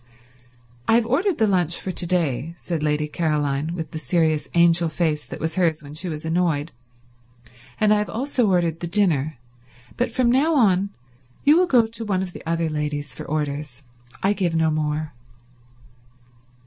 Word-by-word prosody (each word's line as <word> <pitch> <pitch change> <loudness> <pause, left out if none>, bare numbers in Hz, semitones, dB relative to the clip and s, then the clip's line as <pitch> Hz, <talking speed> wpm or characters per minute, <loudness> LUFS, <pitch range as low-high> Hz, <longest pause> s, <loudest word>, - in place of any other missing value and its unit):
"I 225 - +5
have 235 -1 +3
ordered 325 - +1
the 220 - +3
lunch 180 -5 +1
for 190 - -4
to 175 - -1
day," 165 -3 -1
said 170 -3 -4
Lady 150 0 0
Caroline, 150 0 -1
with 160 -3 -5
the 160 - -5
serious 160 -2 +1
angel 170 0 +4
face 155 -2 0
that - - -7
was 160 +4 -3
hers 165 -4 +1
when 145 0 -10
she 175 +4 -5
was 155 -1 -5
annoyed, 165 -2 0 1.1
"and 215 -1 +4
I 210 - +3
have 210 - -2
also 250 -1 0
ordered 170 -3 +1
the 170 - -4
dinner, 160 -7 +1 0.6
but 245 - +1
from 250 -2 +2
now 300 +6 +3
on 200 -6 +3 0.5
you 295 +2 +6
will 360 +1 +4
go 245 -7 +4
to 225 +1 -5
one 190 -3 0
of 180 -2 -7
the - - -9
other 165 0 0
ladies 150 -1 -3
for - - -9
orders. 145 -3 -3 0.4
I 195 +2 +3
give 180 -5 -1
no 160 -1 +2
more." 155 0 -2
170 Hz, 175 wpm, -23 LUFS, 150-200 Hz, 1.1 s, you